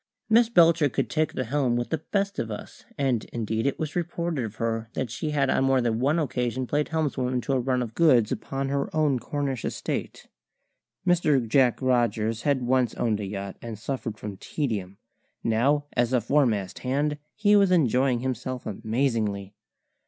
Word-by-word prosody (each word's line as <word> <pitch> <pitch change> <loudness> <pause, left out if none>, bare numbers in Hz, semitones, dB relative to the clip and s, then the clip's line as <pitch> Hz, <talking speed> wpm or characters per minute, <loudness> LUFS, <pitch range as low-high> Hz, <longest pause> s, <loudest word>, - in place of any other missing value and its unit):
Miss 230 +1 +5
Belcher 165 -7 +5
could 125 -2 -2
take 155 +3 0
the 130 - -2
helm 130 0 0
with 120 0 -2
the 160 - 0
best 200 +3 -2
of 115 - -2
us, 105 - -8
and 130 -5 +1
indeed 110 +1 -2
it 140 - -1
was 155 -2 -4
reported 170 -4 -2
of 110 -1 -6
her 115 0 -2
that 130 -4 -3
she 120 +6 -3
had 145 -2 +1
on 135 - +2
more 135 -1 +3
than 115 -2 0
one 140 +6 +2
occasion 125 -4 -1
played 145 +4 0
helmswoman 135 -6 -1
to 135 - -1
a 130 - +2
run 125 0 0
of 115 -2 -7
goods 125 -9 +4
upon 135 0 -3
her 140 0 -1
own 150 -5 +2
Cornish 140 -3 -3
estate. - - -4 0.8
Mr. 155 -9 +3
Jack 125 +1 +3
Rogers 115 -3 +1
had 140 -3 +1
once 125 -1 +2
owned 110 -3 0
a 105 - -3
yacht 100 0 -5
and 115 -2 -6
suffered 115 -1 -4
from 105 -2 -7
tedium; 100 - -3 0.5
now, 135 +6 +2
as 120 +1 +1
a 125 - +4
foremast 115 -6 +1
hand, 145 +3 -1 0.2
he 210 -1 +4
was 200 -2 +5
enjoying 130 -7 +3
himself 130 -1 -3
amazingly. 110 -2 -1
130 Hz, 180 wpm, -26 LUFS, 115-145 Hz, 0.8 s, Miss